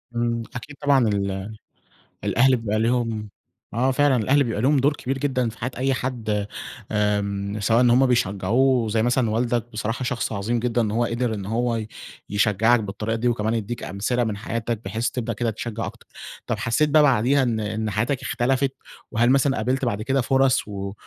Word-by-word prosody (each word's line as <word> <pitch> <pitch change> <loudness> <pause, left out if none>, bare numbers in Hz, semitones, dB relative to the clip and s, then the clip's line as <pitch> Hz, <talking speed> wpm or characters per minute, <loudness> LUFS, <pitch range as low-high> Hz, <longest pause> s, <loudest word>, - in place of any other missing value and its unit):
إمم. 120 0 0
أكيد 145 +4 -7
طبعًا 140 -5 +4
ال 100 0 -2 0.7
الأهل 130 +2 +4
بيبقى 110 -2 -1
ليهم 115 -2 0 0.4
آه 130 +4 +2
فعلًا، 145 0 +3
الأهل 135 +5 +3
بيبقى 115 -4 -2
لهم 140 +4 +3
دور 145 +3 +3
كبير 135 -1 -3
جدًا 130 -3 0
في 110 - -12
حياة 125 +3 -3
أي 135 +1 +1
حد 110 -5 -2 0.4
آمم، 105 -1 -1
سواء 115 +3 +3
إن 125 - +5
هم 125 +3 +5
بيشجّعوه 120 +2 +2
زي 110 +1 +1
مثلًا 120 -1 +2
والدك، 120 +1 0
بصراحة 115 +4 -3
شخص 120 -2 -2
عظيم 110 +3 -1
جدًا 120 0 0
إن 110 - -1
هو 120 +2 +1
قِدِر 115 0 -1
إن 100 -3 -5
هو 115 +2 0
ي 110 -1 -3 0.4
يشجّعك 105 +3 +3
بالطريقة 105 +2 -3
دي 115 +2 -1
وكمان 110 -2 0
يدِّيك 115 +1 -3
أمثلة 120 +6 -1
من 105 -3 -2
حياتك 115 0 -3
بحيث 110 +4 -1
تبدأ 115 -2 -3
كده 115 +2 -1
تشجّع 115 +1 -4
أكتر. - - -10 0.4
طَب - - -1
حسّيت 150 +6 +1
بَقى 150 +1 +5
بعديها 135 0 +3
إن 115 -3 0
إن 110 +1 -2
حياتك 120 +7 -1
اختلفت؟ 130 +2 0 0.4
وهل 120 +3 +2
مثلًا 135 0 +3
قابلت 130 +5 0
بعد 110 -3 -1
كده 135 +4 +1
فرص 135 0 +2
و 100 -1 -5
115 Hz, 185 wpm, -23 LUFS, 105-125 Hz, 0.7 s, إن